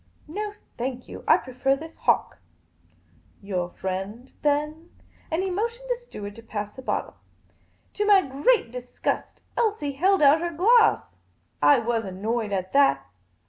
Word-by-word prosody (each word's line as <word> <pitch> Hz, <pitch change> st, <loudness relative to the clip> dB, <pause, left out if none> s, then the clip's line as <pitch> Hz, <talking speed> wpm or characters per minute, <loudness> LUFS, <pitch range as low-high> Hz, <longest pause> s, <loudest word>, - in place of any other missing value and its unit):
" -, -, -38 dB
No, 415 Hz, +6 st, -4 dB, 0.3 s
thank 250 Hz, 0 st, -4 dB
you. -, -, -9 dB
I -, -, +7 dB
prefer 260 Hz, +1 st, 0 dB
this 320 Hz, +3 st, -10 dB
hock." -, -, +1 dB, 1.0 s
Your 185 Hz, -3 st, -3 dB
friend, 195 Hz, +8 st, -5 dB
then? 300 Hz, +3 st, 0 dB, 0.2 s
" -, -, -31 dB
And 335 Hz, +2 st, 0 dB
he 380 Hz, -, -1 dB
motioned 465 Hz, +6 st, -3 dB
the -, -, +3 dB
steward 210 Hz, -, -9 dB
to -, -, -9 dB
pass 210 Hz, -2 st, -5 dB
the 260 Hz, -, -10 dB
bottle. -, -, -3 dB, 0.8 s
To 415 Hz, -, -1 dB
my 400 Hz, -2 st, +6 dB
great 275 Hz, -, +2 dB
disgust, 250 Hz, 0 st, -4 dB
Elsie 420 Hz, -11 st, 0 dB
held 370 Hz, +5 st, +2 dB
out 290 Hz, +3 st, +6 dB
her 345 Hz, -, -1 dB
glass. 425 Hz, -, +3 dB, 0.4 s
I 145 Hz, 0 st, +7 dB
was 230 Hz, -1 st, 0 dB
annoyed 210 Hz, +3 st, -2 dB
at 185 Hz, -1 st, -2 dB
that. 205 Hz, -, +4 dB
275 Hz, 155 wpm, -25 LUFS, -, 1.0 s, I